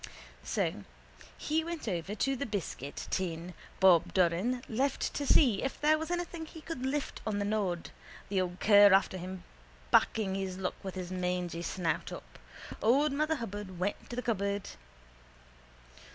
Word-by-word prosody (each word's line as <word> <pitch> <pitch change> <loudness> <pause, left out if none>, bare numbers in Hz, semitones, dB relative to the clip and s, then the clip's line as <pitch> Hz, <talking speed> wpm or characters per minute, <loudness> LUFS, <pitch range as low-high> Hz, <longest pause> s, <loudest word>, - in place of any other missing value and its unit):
_ - - -25 0.4
So - - -1 0.5
he 315 +1 0
went 335 -5 -5
over 185 +1 -2
to 270 +5 +1
the 275 +1 -3
biscuit 160 - -4
tin 175 -1 -2 0.3
Bob 180 -4 +5
Doran 190 +8 +2
left 265 +4 0
to 285 - -2
see 240 -10 +5
if 270 - -3
there 310 +1 +4
was 320 - -4
anything 345 -2 -3
he 320 - -11
could 310 -5 -6
lift 285 +1 -2
on 210 -2 0
the 205 - 0
nod, 200 -5 -1 0.4
the 195 -2 +1
old 180 0 -4
cur 205 -2 +7
after 190 -1 +3
him 185 0 -7 0.5
backing 205 -4 +3
his 190 -1 -3
luck 190 -1 -2
with 190 -1 -6
his 185 -1 -5
mangy 180 -2 -2
snout 170 -1 -2
up. - - -10 0.4
Old 275 +6 +4
Mother 305 +3 +1
Hubbard 205 - -6
went 190 +3 -3
to 240 - -5
the 250 - -3
cupboard. 200 -3 -1
205 Hz, 165 wpm, -31 LUFS, 185-270 Hz, 0.5 s, cur